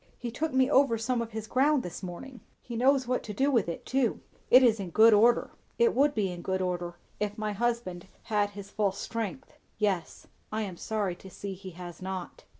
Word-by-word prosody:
"He 240 -1 -5
took 310 +6 -2
me 260 0 +3
over 270 -4 +4
some 235 +2 0
of 230 - -4
his 220 -1 -5
ground 270 +4 +2
this 180 - -6
morning. 220 +8 -8 0.2
He 240 - -8
knows 260 +2 +3
what 250 0 0
to 210 - -7
do 275 +6 +2
with 230 -9 +2
it, 170 - -6
too. 260 -3 +1 0.3
It 255 +1 +8
is 225 -3 +4
in 190 -3 -4
good 220 +5 +6
order." 230 +3 +4 0.3
"It 470 -1 +4
would 285 +2 +3
be 195 -4 0
in 175 -1 -7
good 190 +1 -1
order, 175 -1 -2 0.2
if 210 0 -2
my 215 -1 -2
husband 210 -5 -2 0.2
had 210 -2 +1
his 200 0 -8
full 205 -3 +1
strength." 230 +5 -5 0.2
"Yes. 195 -5 -1 0.3
I 220 +1 -1
am 190 -4 -5
sorry 205 -4 -2
to 190 - -12
see 195 +1 -6
he 190 0 -9
has 175 -1 -9
not." 190 - -6
220 Hz, 215 wpm, -29 LUFS, 190-255 Hz, 0.3 s, It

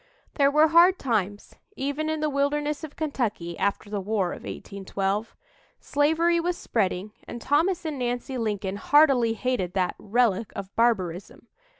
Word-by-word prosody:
There 280 -2 +3
were 305 +2 +4
hard 345 +3 +6
times, 205 -5 -2 0.2
even 285 +2 -2
in 315 -1 -2
the 305 - +1
wilderness 290 +2 -1
of 305 -2 -8
Kentucky, 225 - -3
after 200 +1 -1
the 205 -1 -3
War 195 -3 -1
of - - -6
1812. 195 +2 -4 0.4
Slavery 320 +4 +2
was 350 +1 -1
spreading, 200 -2 -1 0.2
and 240 - -6
Thomas 335 +8 +1
and 300 -4 -3
Nancy 245 +1 -3
Lincoln 205 -4 -2
heartily 270 -3 +4
hated 225 -6 -2
that 185 -2 0
"relic 225 -1 +1
of 195 0 -7
barbarism." 200 -2 -1
240 Hz, 145 wpm, -26 LUFS, 200-295 Hz, 0.4 s, hard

